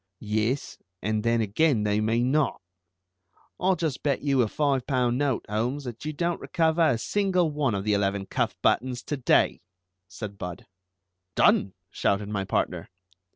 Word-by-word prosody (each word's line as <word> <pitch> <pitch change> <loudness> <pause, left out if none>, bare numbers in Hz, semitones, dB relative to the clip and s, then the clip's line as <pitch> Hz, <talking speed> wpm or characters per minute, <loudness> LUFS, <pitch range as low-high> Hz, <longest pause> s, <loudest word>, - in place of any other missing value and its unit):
"Yes, 110 +5 -1 0.2
and, 105 +2 0
then, 115 0 +2
again, 110 +3 +2
they 105 0 +1
may 115 +2 +1
not. 140 +4 +1 1.0
I'll 185 +1 +3
just 160 -6 -2
bet 140 -3 0
you 140 -3 +3
a 115 - +2
five 140 +1 0
pound 125 -2 +1
note, 140 -4 0
Holmes, 120 +7 -1
that 120 -3 -7
you 155 - -1
don't 170 +3 -2
recover 160 0 +1
a 155 -7 +4
single 185 - +1
one 145 -7 0
of 100 - -2
the 105 0 +1
eleven 100 -1 0
cuff - - -1
buttons 125 0 +1
to 145 - -3
day," 130 - +2 0.5
said 100 +2 -8
Budd. 90 -1 -6 0.7
"Done!" 95 - +3 0.2
shouted 100 +1 0
my 100 -2 -2
partner. 90 -3 -2
120 Hz, 160 wpm, -26 LUFS, 105-145 Hz, 1.0 s, a